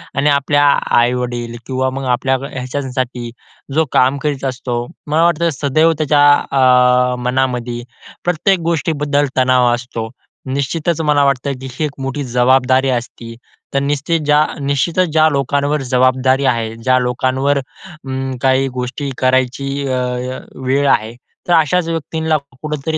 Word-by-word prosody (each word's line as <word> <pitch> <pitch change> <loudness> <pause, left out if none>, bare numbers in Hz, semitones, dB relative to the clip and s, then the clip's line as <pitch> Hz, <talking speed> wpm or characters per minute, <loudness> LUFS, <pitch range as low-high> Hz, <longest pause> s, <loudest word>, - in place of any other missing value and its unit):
आणि 140 +2 +2
आपल्या 145 0 +2
आ 140 - +4 0.2
आई-वडील 120 -1 -1
किंवा 130 0 0
मग 135 +1 -5
आपल्या 130 +2 +1 0.2
ह्याच्यासाठी, 130 -2 -4 0.4
जो 160 +2 +2
काम 130 +2 +3
करीत 145 -3 -2
असतो. 130 -1 -3 0.3
मला 155 +2 +2
वाटतं 170 0 +2
सदैव 155 +4 +2
त्याच्या 145 -1 +3 0.3
अ, 125 -1 +4
मनामध्ये 125 -2 -1 0.4
प्रत्येक 175 +2 +1
गोष्टीबद्दल 150 -3 0
तणाव 125 -1 +3
असतो. 120 -2 -5 0.4
निश्चितच 155 +4 -1
मला 150 -2 +2
वाटतं, 140 0 0
की 130 - -6
ही 155 +5 -2
एक 150 - -3
मोठी 135 +2 -3
जबाबदारी 130 +1 +2
असती 120 -1 -4 0.4
तर 140 - +2
निश्चित 145 +4 -1
ज्या 150 +1 +4 0.2
निश्चितच 150 +6 +1
ज्या 155 0 +5
लोकांवर 140 +1 0
जबाबदारी 130 +1 +2
आहे, 115 -3 0
ज्या 130 +3 +1
लोकांवर 130 +3 0
अं, 135 -3 -7
काही 135 0 +2
गोष्टी 130 +3 -4
करायची 130 +1 +1 0.2
अ, 130 - -1
अ, 125 0 -3 0.3
वेळ 140 +2 +2
आहे. 110 +1 +1 0.3
तर 175 - +2
अशाच 165 +1 +2
व्यक्तींना 160 -1 -1 0.2
कुठेतरी 155 +1 -3
135 Hz, 140 wpm, -17 LUFS, 125-150 Hz, 0.4 s, ज्या